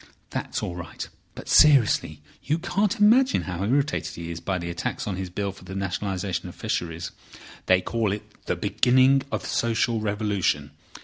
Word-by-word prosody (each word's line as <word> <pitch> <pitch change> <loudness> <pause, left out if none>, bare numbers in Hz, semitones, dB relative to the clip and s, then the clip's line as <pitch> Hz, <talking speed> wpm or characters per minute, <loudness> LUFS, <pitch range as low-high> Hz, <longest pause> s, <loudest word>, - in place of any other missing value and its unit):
"That's - - -3
all 90 - -3
right. 85 -1 -7 0.3
But - - -9
seriously, 115 - +5 0.2
you 155 +3 +1
can't 200 +5 0
imagine 250 +6 +5
how 90 0 -4
irritated 125 - 0
he 85 0 -6
is 85 - -5
by 95 +1 -2
the 85 -1 -4
attacks 85 - -3
on 100 - -2
his 95 0 -4
Bill 100 +2 -2
for 95 - -15
the 95 - -8
Nationalisation 95 -2 -2
of - - -12
Fisheries. 85 -1 -3 0.6
They 95 0 +5
call 115 0 -1
it 105 +1 -3 0.2
the - - +1
beginning 130 +2 +4
of - - -2
social 115 0 +1
revolution. 100 -8 0
100 Hz, 170 wpm, -25 LUFS, 90-130 Hz, 0.6 s, seriously